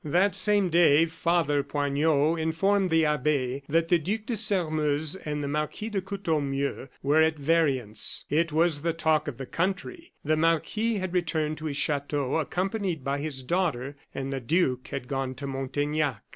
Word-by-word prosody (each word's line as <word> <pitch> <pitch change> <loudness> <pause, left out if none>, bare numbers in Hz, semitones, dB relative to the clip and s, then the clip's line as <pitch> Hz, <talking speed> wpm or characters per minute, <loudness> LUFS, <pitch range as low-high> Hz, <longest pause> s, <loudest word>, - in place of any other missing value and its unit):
That 180 +6 +2
same 200 0 +3
day 165 -2 +5
Father 165 -3 +1
Poignot 145 +3 +1
informed 185 +5 +1
the 160 -1 +3
abbe 140 -3 0
that 165 +2 +1
the 175 - +4
Duc 205 +8 -2
de 235 - -2
Sairmeuse 155 -7 +2
and 150 -5 -4
the - - -2
Marquis 150 +9 -3
de 200 -3 -2
Courtornieu 150 -9 -2 0.2
were 145 +3 +4
at 160 0 +2
variance. 140 -8 +1
It 160 +2 +1
was 160 -1 +2
the 165 +1 0
talk 155 -2 +1
of 135 -5 -5
the 135 - -6
country. 195 - -3
The 155 +1 +2
marquis 165 +8 +1
had 185 -3 -3
returned 155 -3 -1
to 155 - -7
his 145 -2 -2
chateau, 145 -2 0
accompanied 185 0 -2
by 140 +1 -1
his 140 -3 -3
daughter, 145 -4 -1 0.2
and 135 0 -4
the 135 - -2
duke 130 -2 0
had 125 - -5
gone 135 -1 -3
to 140 +2 -7
Montaignac. 140 -1 -2
155 Hz, 170 wpm, -27 LUFS, 140-175 Hz, 0.2 s, day